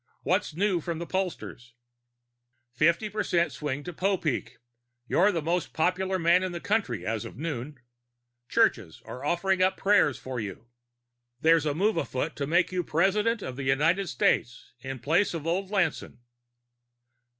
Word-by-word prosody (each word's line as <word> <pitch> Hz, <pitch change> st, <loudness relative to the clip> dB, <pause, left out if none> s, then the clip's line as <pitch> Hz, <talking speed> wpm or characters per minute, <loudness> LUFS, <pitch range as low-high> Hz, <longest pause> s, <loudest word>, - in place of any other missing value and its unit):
What's 150 Hz, -, 0 dB
new 190 Hz, -1 st, +1 dB
from 170 Hz, +1 st, -4 dB
the 170 Hz, -, -5 dB
pollsters?" 170 Hz, -10 st, -4 dB, 1.0 s
"Fifty 165 Hz, -, +2 dB
percent 180 Hz, -6 st, 0 dB
swing 145 Hz, 0 st, -4 dB
to 175 Hz, -, -7 dB
Popeek. 185 Hz, -5 st, -1 dB, 0.5 s
You're 195 Hz, +4 st, +4 dB
the 165 Hz, -4 st, -2 dB
most 175 Hz, +2 st, -1 dB
popular 185 Hz, +3 st, 0 dB
man 170 Hz, +1 st, +4 dB
in 185 Hz, -1 st, -3 dB
the 170 Hz, -, -4 dB
country, 150 Hz, -, -1 dB
as 110 Hz, 0 st, -2 dB
of -, -, -9 dB
noon. 145 Hz, -2 st, -5 dB, 0.7 s
Churches 110 Hz, -, +1 dB
are 125 Hz, -, -8 dB
offering 185 Hz, +4 st, +1 dB
up 185 Hz, +1 st, +3 dB
prayers 180 Hz, -10 st, +3 dB
for 130 Hz, 0 st, -5 dB
you. 105 Hz, +1 st, -6 dB, 0.7 s
There's 160 Hz, -1 st, +4 dB
a 145 Hz, -, 0 dB
move 205 Hz, +3 st, +1 dB
afoot 150 Hz, -1 st, -2 dB
to 140 Hz, -, -2 dB
make 175 Hz, +5 st, +2 dB
you 180 Hz, -1 st, -1 dB
President 200 Hz, +8 st, +1 dB
of 130 Hz, -1 st, -6 dB
the 140 Hz, -, -4 dB
United 165 Hz, +8 st, +2 dB
States 125 Hz, -1 st, 0 dB
in 135 Hz, +1 st, -6 dB
place 160 Hz, -, +1 dB
of 160 Hz, -2 st, -5 dB
old 185 Hz, +3 st, -1 dB
Lanson." 190 Hz, -11 st, -1 dB
165 Hz, 155 wpm, -27 LUFS, 140-190 Hz, 1.0 s, You're